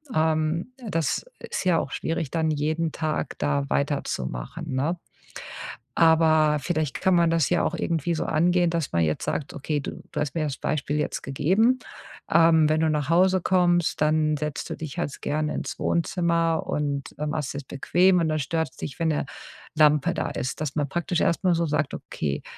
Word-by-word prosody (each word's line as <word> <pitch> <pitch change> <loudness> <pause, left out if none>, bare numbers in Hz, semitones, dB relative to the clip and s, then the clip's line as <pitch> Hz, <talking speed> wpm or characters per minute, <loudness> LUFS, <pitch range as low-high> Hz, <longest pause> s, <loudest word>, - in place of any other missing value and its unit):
Ähm, 155 +5 +1 0.2
das 165 - -1
ist - - -4
ja 175 -3 +4
auch - - -3
schwierig, 165 -3 -2
dann 160 -1 +1
jeden 155 +2 -1
Tag 155 -1 -2
da 70 -1 0
weiterzumachen, 70 - -2
ne? 155 +7 0 1.0
Aber 160 -2 +4
vielleicht 155 -3 -2
kann 190 - +3
man 170 -1 +4
das 165 -4 +2
ja 175 - +2
auch - - 0
irgendwie 170 0 -1
so - - -1
angehen, 175 +2 +2
dass 165 -4 -2
man 85 - +3
jetzt 75 -1 -1
sagt, 145 - -3
okay, 145 +1 -2
du - - -7
du - - -2
hast 145 -3 -2
mir 160 -2 0
das 140 -3 -3
Beispiel 145 -1 -2
jetzt 150 - -2
gegeben, 190 - +2 0.5
ähm, 165 -1 +5
wenn 155 0 +2
du 160 - +3
nach 150 -2 -1
Hause 185 +2 +4
kommst, 175 -2 +2
dann 155 0 +2
setzt 150 -1 -4
du - - -3
dich 155 -4 -7
halt's 140 - -3
gerne 150 +1 -1
ins - - -4
Wohnzimmer 170 -1 +1
und, 140 -2 -2
äh, 150 - -1
machst 150 -2 -2
dir's 140 -1 -6
bequem 180 +7 +3
und 160 - +1
dann 155 0 0
stört's 160 +1 -2
dich, 145 - -6
wenn 165 -1 +1
'ne 150 -2 0 0.5
Lampe 150 +2 +4
da - - -2
ist. 130 +4 -4
Dass 150 -3 -2
man 145 -2 0
praktisch 175 +2 -1
erst 170 - +1
mal 180 -2 +4
so 170 0 +1
sagt: 145 -1 0
„Okay, 70 -2 -4
155 Hz, 190 wpm, -25 LUFS, 145-170 Hz, 1.0 s, ähm